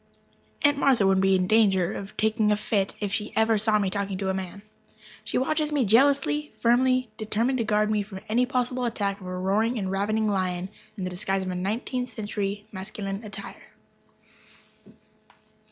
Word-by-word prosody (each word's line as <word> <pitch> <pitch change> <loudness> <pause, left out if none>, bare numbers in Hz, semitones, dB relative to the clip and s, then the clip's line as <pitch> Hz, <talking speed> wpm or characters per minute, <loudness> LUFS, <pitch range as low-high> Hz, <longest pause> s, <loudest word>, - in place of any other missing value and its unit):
Aunt 290 -1 +4
Martha 260 -8 +4
would 190 0 +3
be 195 0 +4
in 185 -1 +2
danger 195 -4 +3
of 195 +1 -8
taking 215 0 +2
a - - +4
fit 205 -2 -1
if 205 -2 -3
she 210 -1 -2
ever 220 -1 +3
saw 215 0 +3
me 195 -2 0
talking 200 -1 -2
to 190 0 -2
a - - +1
man. 190 +1 -6 0.6
She - - -2
watches 305 +3 0
me 285 -5 +2
jealously, 280 +6 +3
firmly 255 0 +2
determined 230 +4 0
to - - +2
guard 215 0 +1
me 210 -1 +1
from 195 -2 -8
any 245 +3 +2
possible 250 -1 -1
attack 200 -4 -2
of 185 - -8
a 180 0 -4
roaring 210 +6 +1
and 190 -3 -2
ravening 215 +3 0
lion 185 -2 -1 0.3
in 190 - -4
the 185 - -3
disguise 190 +2 -2
of 185 - -4
nineteenth 220 +7 -2
century 205 -2 -4
masculine 195 +1 -5
attire. 200 -1 -8
210 Hz, 175 wpm, -26 LUFS, 195-235 Hz, 0.6 s, Aunt